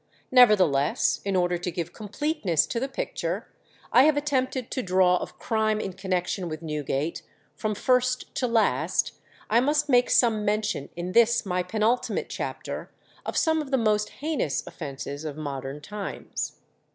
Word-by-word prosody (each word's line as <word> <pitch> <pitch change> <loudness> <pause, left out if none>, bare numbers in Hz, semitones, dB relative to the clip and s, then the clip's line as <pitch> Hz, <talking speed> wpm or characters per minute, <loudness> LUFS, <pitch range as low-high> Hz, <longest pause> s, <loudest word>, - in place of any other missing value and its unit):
Nevertheless, 190 - +4
in 200 -1 -1
order 175 -1 +1
to 175 - -3
give 170 -1 -4
completeness 215 - 0
to 230 - -2
the 265 - -1
picture 270 - -3 0.5
I 260 - +8
have 305 -1 +4
attempted 260 -4 -1
to 260 - -1
draw 185 -2 +3
of - - -7
crime 220 -1 0
in 195 -3 -4
connection 185 -1 -2
with 155 +1 -6
Newgate, 150 0 -2 0.3
from 215 -1 -2
first 255 +2 +1
to 250 - 0
last, 230 -2 +1 0.4
I 225 - +4
must 295 +3 +1
make 245 -2 +4
some 225 -3 +3
mention, 210 -7 -1
in 175 +1 -4
this 235 +2 +4
my 180 -1 0
penultimate 220 +6 0
chapter, - - -5 0.4
of - - -2
some 320 -2 +3
of 290 - -7
the 265 - +2
most 215 -2 +1
heinous 295 - -2
offences 140 -1 -6
of 150 -2 -5
modern 140 -1 -5
times. 205 +3 -5
210 Hz, 155 wpm, -26 LUFS, 175-250 Hz, 0.5 s, I